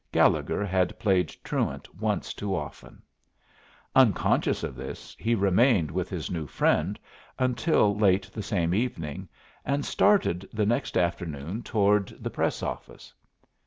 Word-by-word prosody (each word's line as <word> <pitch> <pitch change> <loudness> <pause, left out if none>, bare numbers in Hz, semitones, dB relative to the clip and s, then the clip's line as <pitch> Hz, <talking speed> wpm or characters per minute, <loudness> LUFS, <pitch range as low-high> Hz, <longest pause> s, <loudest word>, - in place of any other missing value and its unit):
Gallegher 105 - +2
had 95 -2 0
played 95 -4 +2
truant - - -3
once - - -2
too 100 -2 -3
often. 75 -4 -8 0.9
Unconscious 125 -8 +3
of - - -3
this, 65 +1 -8
he 115 +2 +1
remained 100 - +3
with 90 +2 -2
his 85 -5 -4
new 80 -4 -3
friend 90 +7 +1 0.4
until 125 -4 +2
late 100 -2 +3
the 110 - -4
same 90 -5 0
evening, 90 - -3 0.3
and 140 +1 -1
started 100 - +2
the 105 -1 0
next 115 +3 0
afternoon 85 +2 -2
toward 105 -3 +2
the - - -4
Press - - -1
office. - - -7
95 Hz, 130 wpm, -27 LUFS, 85-110 Hz, 0.9 s, Unconscious